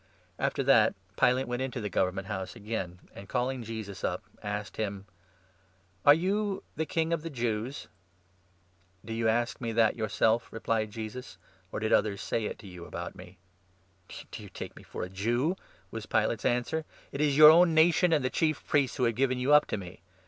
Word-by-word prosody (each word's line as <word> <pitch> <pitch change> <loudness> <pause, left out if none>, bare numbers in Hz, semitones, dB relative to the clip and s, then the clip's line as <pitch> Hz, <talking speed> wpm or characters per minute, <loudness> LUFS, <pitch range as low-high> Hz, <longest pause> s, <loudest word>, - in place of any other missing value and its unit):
After - - 0
that, - - +5 0.2
Pilate 125 +2 +3
went 120 +1 -2
into 130 -1 -3
the 105 - -3
Government 95 0 -1
House 95 0 -5
again, 105 -5 -4 0.2
33 - - -12
and 100 - -11
calling 125 0 -1
Jesus 110 -4 -7
up, - - -1 0.2
asked 105 -1 -4
him: 100 -2 -3 0.5
" 95 -1 -36
Are 145 - +11
you 195 +4 -1
the 160 +1 -2
King 165 0 0
of 165 - -1
the 165 - -5
Jews? 120 -1 -3 0.6
" 90 -1 -32
"Do 115 - -5
you 115 0 +1
ask 120 +2 0
me 115 -2 -2
that 110 -1 +3
yourself?" 110 +1 +1
replied 110 -1 -1
Jesus, 110 0 -7 0.3
"or - - -3
did 110 0 -1
34 - - +6
others 105 -2 -4
say 115 - -1
it - - -4
to 100 - -12
you 90 -2 -9
about 85 0 -6
me? 90 +1 -13 0.2
" 95 0 -37 0.2
" - - -11
Do - - -7
you - - -10
take - - -8
me - - -12
for - - -6
a - - -3
Jew? 120 - 0 0.2
" 95 -2 -31
was 110 -1 -6
Pilate's 110 0 0
answer. 125 +6 +1 0.2
" - - -26
It 140 - -3
is 150 -2 +3
35 - - -1
your 155 0 +11
own 170 0 +5
nation 170 +2 +5
and 150 -5 +2
the 130 - 0
Chief 155 -2 0
Priests 140 -3 +1
who 125 - 0
have 115 -1 +3
given 130 +2 +1
you 130 +4 +2
up 150 0 +6
to - - -2
me. 90 -3 -9
115 Hz, 220 wpm, -29 LUFS, 100-135 Hz, 0.6 s, Are